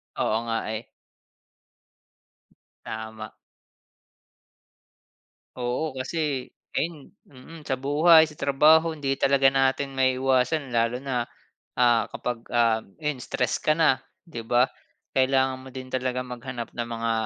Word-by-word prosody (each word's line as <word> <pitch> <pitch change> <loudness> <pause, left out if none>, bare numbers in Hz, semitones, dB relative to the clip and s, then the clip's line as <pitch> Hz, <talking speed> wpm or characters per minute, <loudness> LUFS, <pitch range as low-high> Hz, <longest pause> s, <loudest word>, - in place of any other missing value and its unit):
Oo 110 - +1
nga, 115 0 0 0.2
eh. 110 - -7 2.0
Tama. 110 -1 -7 2.2
Oo. 130 +4 -2
Kasi 135 0 -2 0.3
ayun, 155 -3 -2 0.2
mm, 150 +4 -13
sa 130 - -2
buhay, 160 +3 +6
sa 150 - -13
trabaho, 155 +4 +4
hindi 140 -3 -2
talaga 135 0 +3
natin 135 0 +1
maiiwasan, 130 +1 +1
lalo 115 +2 +1
na, 130 -3 -2 0.5
ah, 120 -3 +3
kapag 120 -1 -4
ah, 115 -2 +3 0.2
ayan 150 -3 -1
stress 125 -1 -1
ka 155 - +2
na, 155 -6 +3 0.3
'di 115 -8 -7
ba? 125 +2 +3 0.5
Kailangan 130 0 +2
mo 130 0 -12
din 130 0 -7
talaga 125 0 -1
maghanap 125 -1 -7
ng 120 - -4
mga 115 0 -1
130 Hz, 120 wpm, -25 LUFS, 120-140 Hz, 2.2 s, buhay